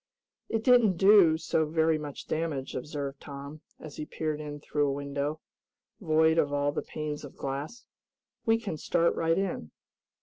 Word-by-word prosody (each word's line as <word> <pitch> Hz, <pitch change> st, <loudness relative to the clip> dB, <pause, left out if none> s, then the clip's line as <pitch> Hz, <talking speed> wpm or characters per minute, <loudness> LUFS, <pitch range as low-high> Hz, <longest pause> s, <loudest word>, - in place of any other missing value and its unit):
"It 225 Hz, -1 st, -1 dB
didn't 235 Hz, -7 st, +5 dB
do 190 Hz, -4 st, +6 dB
so 160 Hz, 0 st, 0 dB
very 160 Hz, 0 st, +2 dB
much 145 Hz, -2 st, -7 dB
damage," 155 Hz, -5 st, -2 dB
observed 140 Hz, 0 st, -5 dB
Tom, 140 Hz, +2 st, -9 dB, 0.2 s
as 155 Hz, -, -10 dB
he 155 Hz, -, -4 dB
peered 155 Hz, -1 st, -3 dB
in 145 Hz, -1 st, -6 dB
through 145 Hz, 0 st, 0 dB
a -, -, +1 dB
window, 140 Hz, +2 st, -3 dB, 0.6 s
void 160 Hz, -3 st, +3 dB
of 145 Hz, -, +2 dB
all 145 Hz, 0 st, +1 dB
the -, -, -2 dB
panes 150 Hz, -1 st, -5 dB
of 145 Hz, -, -11 dB
glass. 140 Hz, -, -5 dB, 0.6 s
"We 225 Hz, 0 st, +3 dB
can 200 Hz, -8 st, -4 dB
start 170 Hz, +3 st, +2 dB
right 165 Hz, +1 st, +1 dB
in." 190 Hz, -, -2 dB
155 Hz, 165 wpm, -29 LUFS, 145-165 Hz, 0.6 s, do